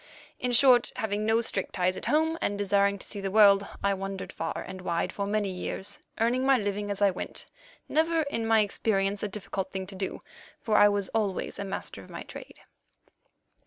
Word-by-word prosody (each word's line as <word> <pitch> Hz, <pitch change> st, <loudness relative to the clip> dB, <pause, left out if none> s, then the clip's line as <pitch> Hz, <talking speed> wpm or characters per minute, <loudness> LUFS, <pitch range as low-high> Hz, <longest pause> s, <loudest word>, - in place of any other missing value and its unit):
In 250 Hz, -, -1 dB
short, 245 Hz, 0 st, +5 dB
having 215 Hz, -2 st, -2 dB
no 225 Hz, +1 st, +3 dB
strict 200 Hz, -4 st, -2 dB
ties 185 Hz, 0 st, +1 dB
at -, -, -5 dB
home, 320 Hz, +2 st, +2 dB
and 200 Hz, -, -1 dB
desiring 200 Hz, 0 st, +2 dB
to -, -, -10 dB
see 200 Hz, -, -4 dB
the 195 Hz, -, -2 dB
world, 200 Hz, -1 st, +6 dB, 0.2 s
I 200 Hz, 0 st, +3 dB
wandered 195 Hz, 0 st, -5 dB
far -, -, -4 dB
and 190 Hz, -1 st, -8 dB
wide 170 Hz, -2 st, -1 dB
for 200 Hz, -1 st, -3 dB
many 205 Hz, -1 st, 0 dB
years, 185 Hz, +1 st, -5 dB, 0.2 s
earning 240 Hz, +3 st, +2 dB
my 270 Hz, 0 st, +5 dB
living 205 Hz, -1 st, -2 dB
as 200 Hz, 0 st, 0 dB
I 200 Hz, -, +5 dB
went, 180 Hz, -, -4 dB, 0.4 s
never, 325 Hz, +1 st, +2 dB
in 230 Hz, -6 st, -2 dB
my 225 Hz, -1 st, +5 dB
experience, 200 Hz, -1 st, 0 dB
a -, -, -1 dB
difficult 195 Hz, -1 st, -5 dB
thing 190 Hz, -1 st, -4 dB
to 195 Hz, +1 st, -10 dB
do, 190 Hz, 0 st, -4 dB, 0.4 s
for 215 Hz, -, -1 dB
I 205 Hz, -, +7 dB
was 200 Hz, -1 st, -1 dB
always 210 Hz, -4 st, -2 dB
a 200 Hz, -, -3 dB
master 195 Hz, -, -5 dB
of -, -, -16 dB
my -, -, -7 dB
trade. -, -, -11 dB
205 Hz, 200 wpm, -28 LUFS, 195-225 Hz, 0.4 s, I